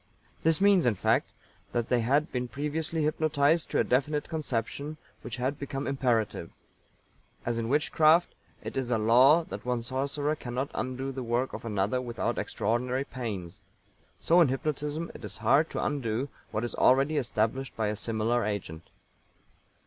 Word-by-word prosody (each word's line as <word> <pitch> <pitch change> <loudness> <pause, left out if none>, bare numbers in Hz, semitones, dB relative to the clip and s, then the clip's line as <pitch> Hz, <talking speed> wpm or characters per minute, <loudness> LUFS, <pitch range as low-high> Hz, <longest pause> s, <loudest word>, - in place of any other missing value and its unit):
This 160 -1 +3
means, 195 -6 +5
in 115 - +3
fact, - - +1 0.4
that 120 -1 -1
they 125 - +3
had 140 +7 +1
been 125 -1 -2
previously 150 +4 -2
hypnotised 155 +1 +2
to - - +1
a - - +4
definite 145 +3 0
conception 145 0 -3 0.2
which 120 - -6
had 130 +4 -2
become 140 0 -4
imperative. 120 -10 0 1.0
As 120 -1 -1
in 115 0 -2
Witchcraft, 155 +4 +4 0.3
it - - -6
is 130 -2 -2
a 120 - +2
law 125 +9 +6
that - - -8
one 125 -1 -1
sorcerer 140 +4 -1
cannot 130 0 -4
undo 130 +1 -3
the 130 0 -5
work 120 +2 -1
of - - -7
another 105 +3 0
without 120 -2 -2
extraordinary 125 +4 -1
pains; 100 -9 -6 0.6
so 175 +2 +4
in 165 - +6
hypnotism 150 +4 -2
it - - -12
is - - -5
hard 150 +4 +3
to - - -3
undo 130 -2 -1 0.2
what 110 - -2
is 120 - -3
already 135 +4 +3
established 120 0 -1
by 110 -2 0
a 105 - -2
similar 115 +2 0
agent. 90 -6 -4
130 Hz, 160 wpm, -29 LUFS, 115-150 Hz, 1.0 s, law